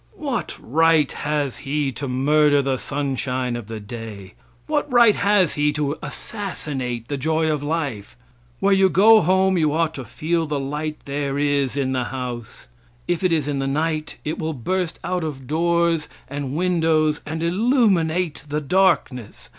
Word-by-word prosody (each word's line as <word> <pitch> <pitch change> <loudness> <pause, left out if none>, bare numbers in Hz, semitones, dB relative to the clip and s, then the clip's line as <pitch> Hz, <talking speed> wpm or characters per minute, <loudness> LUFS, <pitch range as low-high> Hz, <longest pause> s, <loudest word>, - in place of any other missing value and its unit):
What 250 - -3
right 160 +2 +3
has 145 -3 -2
he 140 0 -1
to 140 +2 -5
murder 145 +2 +3
the 135 -1 0
sunshine 130 -3 -2
of 120 -3 -6
the 110 -1 -6
day? 105 -3 -8 0.3
What 295 -2 -1
right 235 -3 +6
has 200 -5 +3
he 150 0 +1
to 145 0 -1
assassinate 130 - -5
the 145 - -3
joy 160 +3 +1
of 150 -2 -1
life? 145 -10 -3 0.4
Where 200 0 +3
you 190 0 +4
go 215 +4 +6
home 190 +1 +3
you 155 -2 +2
ought 160 0 +1
to 135 - -6
feel 165 +7 -1
the 145 -1 -1
light 150 +3 -3
there 140 0 -2
is 145 -2 +1
in 135 -2 0
the 130 -2 -1
house; 125 -3 -6 0.4
if 175 0 -1
it 185 - +3
is 155 -4 +1
in 145 -2 -1
the 135 - -1
night 155 +2 -2
it 155 +2 -3
will 160 0 -2
burst 175 +6 -2
out 180 -1 -1
of 140 -4 -5
doors 170 +2 +1 0.2
and 140 0 -4
windows 160 -3 +2
and 160 +1 -3
illuminate 180 - +1
the 150 +1 -1
darkness. 145 - 0
150 Hz, 165 wpm, -22 LUFS, 135-170 Hz, 0.4 s, right